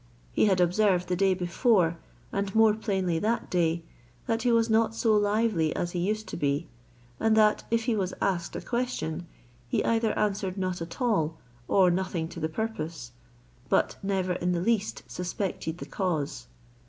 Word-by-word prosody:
He - - +3
had 190 -3 +3
observed 180 0 +2
the 180 - +1
day 190 +1 +3
before, 175 -1 +2 0.3
and 200 0 -2
more 220 -1 +6
plainly 190 -6 -1
that 225 +5 -1
day, 170 -2 +1 0.4
that 225 0 0
he 245 - +2
was 230 -1 +3
not 225 0 +2
so 225 -1 +2
lively 205 -6 +2
as 175 - -2
he 175 - -2
used 215 +4 -1
to - - -5
be; 145 +1 0 0.5
and 220 0 +3
that, 215 -1 +4
if 230 0 +1
he 235 -1 +1
was 190 -3 -1
asked 175 -3 -1
a - - -3
question, 235 -9 -3 0.4
he - - 0
either 225 -1 +1
answered 200 -2 -1
not 185 -2 -2
at 165 0 -7
all, 165 -10 +1 0.3
or 185 -2 +4
nothing 175 -2 -1
to 170 - -8
the 160 0 -1
purpose; 160 - -4 0.6
but - - +2
never 190 -2 0
in 180 0 -1
the 175 - 0
least 215 +2 0
suspected 180 -2 -3
the - - -7
cause. 155 - -2
190 Hz, 175 wpm, -28 LUFS, 170-220 Hz, 0.6 s, more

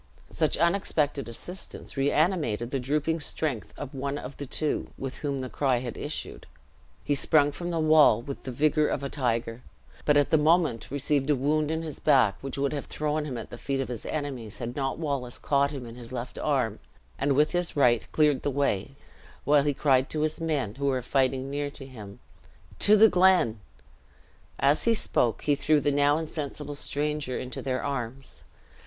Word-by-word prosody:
Such - - +1
unexpected 155 -7 +1
assistance 180 +11 -8
reanimated 140 - +1
the 135 - 0
drooping 150 +5 0
strength 145 -5 -4
of 145 -1 -7
one 140 +1 -3
of 135 -1 -7
the 145 - -6
two, 150 +3 -2
with 135 -1 -5
whom 140 -2 -2
the 130 -1 -4
cry 130 -1 +1
had 120 -1 -5
issued. 150 +2 -6 0.6
He 145 - 0
sprung 145 +1 +3
from 175 +4 -5
the 165 -1 -1
wall 155 -7 +6
with 135 +3 -7
the 130 - -6
vigor 150 +3 +2
of 140 - -2
a 140 - -3
tiger, 120 -4 -2 0.4
but 150 -1 +4
at 145 - +2
the 160 - +5
moment 155 - +2
received 140 0 0
a 145 - +4
wound 150 +3 +1
in 160 +1 -2
his 155 -3 -6
back, 130 -9 +4
which 135 0 -5
would 140 +1 0
have 145 - -4
thrown 150 0 -2
him 130 -5 -4
at 115 - -8
the 120 - -8
feet 135 -1 -2
of 135 -3 -2
his 120 -3 -5
enemies, 135 -8 -4
had 120 0 -5
not 135 -2 -2
Wallace 140 -6 -3
caught 140 0 +2
him 135 -4 -6
in 115 - -9
his 120 0 -10
left 125 -1 -5
arm, 125 -7 0 0.4
and 140 +1 +2
with 150 +3 +3
his 175 -1 -1
right, 120 -5 +3
cleared 150 -3 +3
the - - -1
way, 135 -4 -1 0.5
while 145 0 +4
he 145 +1 +1
cried 135 -1 +2
to 155 - -2
his 155 +1 -1
men 145 -10 -1
who 140 +3 -2
were 130 -2 0
fighting 135 +1 0
near 145 0 -2
him 125 -8 -11 0.6
"To 210 +1 +7
the 220 +2 +8
Glen!" 180 - +4 1.0
As 140 +2 +2
he 230 -1 +4
spoke, 120 - +1
he 145 - +3
threw 150 +2 +3
the 145 +1 +1
now 145 +1 +3
insensible 150 -2 -5
stranger 145 -2 -2
into 125 -1 -5
their 130 -1 -2
arms. 135 -1 -4
140 Hz, 190 wpm, -27 LUFS, 130-150 Hz, 1.0 s, the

